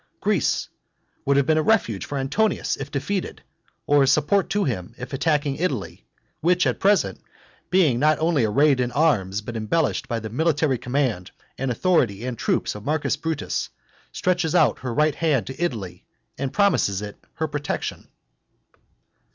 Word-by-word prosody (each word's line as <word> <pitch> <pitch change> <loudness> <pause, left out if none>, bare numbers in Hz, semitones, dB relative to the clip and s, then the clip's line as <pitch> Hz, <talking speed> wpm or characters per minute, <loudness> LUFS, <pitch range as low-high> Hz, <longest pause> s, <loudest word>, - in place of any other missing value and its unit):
Greece - - +1 0.6
would 140 0 +3
have 140 - +3
been 155 +2 +3
a - - +3
refuge 155 - +1
for 145 - -4
Antonius 185 +11 0
if 135 0 -7
defeated, 185 +8 -3 0.4
or 145 0 +4
a 135 - +4
support 155 +8 +2
to 205 0 +1
him 95 - -3
in 125 - -6
attacking 145 0 0
Italy, 145 - -3 0.3
which 180 +2 +2
at - - 0
present, 190 - +2 0.5
being 165 -10 +3
not 155 +2 +3
only 160 -5 +1
arrayed 135 +6 +3
in 125 -1 0
arms, 105 - +1
but 115 +2 -7
embellished 115 +9 0
by 115 -1 -2
the 110 -1 -7
military 150 -1 +1
command 125 -8 -1 0.3
and 135 0 -2
authority 120 - +1
and 125 -3 -4
troops - - 0
of 105 - -9
Marcus 150 +2 0
Brutus 160 0 -3 0.4
stretches 175 -3 0
out - - +4
her 125 - -4
right 150 +5 +2
hand 145 - +1
to 135 +6 -5
Italy, 100 - -4 0.3
and 135 0 -3
promises 160 - +2
it 105 0 -9
her 160 -1 -1
protection. 145 0 -4
140 Hz, 160 wpm, -23 LUFS, 120-160 Hz, 0.6 s, or